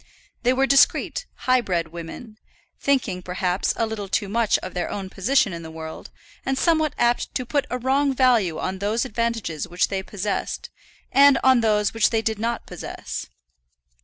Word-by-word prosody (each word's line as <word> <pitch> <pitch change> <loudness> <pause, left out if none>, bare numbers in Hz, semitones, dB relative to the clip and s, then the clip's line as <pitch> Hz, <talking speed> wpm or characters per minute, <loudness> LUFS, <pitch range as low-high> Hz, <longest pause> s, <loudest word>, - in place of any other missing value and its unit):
They 250 - +3
were 265 +1 +3
discreet, 275 - +3 0.2
high 255 0 +4
bred 170 -6 -1
women, 175 +7 -9 0.4
thinking, 240 -10 0
perhaps, 180 +1 -1
a 230 - +1
little 220 -3 -5
too 200 - 0
much 225 +1 +2
of 185 - -6
their 180 - -2
own 190 -2 -5
position 215 0 +2
in 170 - -6
the 160 - -8
world, 160 0 -8 0.3
and 265 0 -1
somewhat 315 -1 +2
apt 240 0 +1
to 255 - -1
put 280 +2 0
a 250 - -1
wrong 270 +3 +2
value 240 -10 +3
on 190 +1 -3
those 215 +5 0
advantages 230 - -2
which 175 +1 0
they 195 -1 -2
possessed, 200 0 -4 0.4
and 280 0 +7
on 260 -2 +5
those 210 -2 +2
which 225 -1 +3
they 225 -1 0
did 220 -2 -1
not 235 +2 -2
possess. - - -6
220 Hz, 175 wpm, -23 LUFS, 190-255 Hz, 0.4 s, and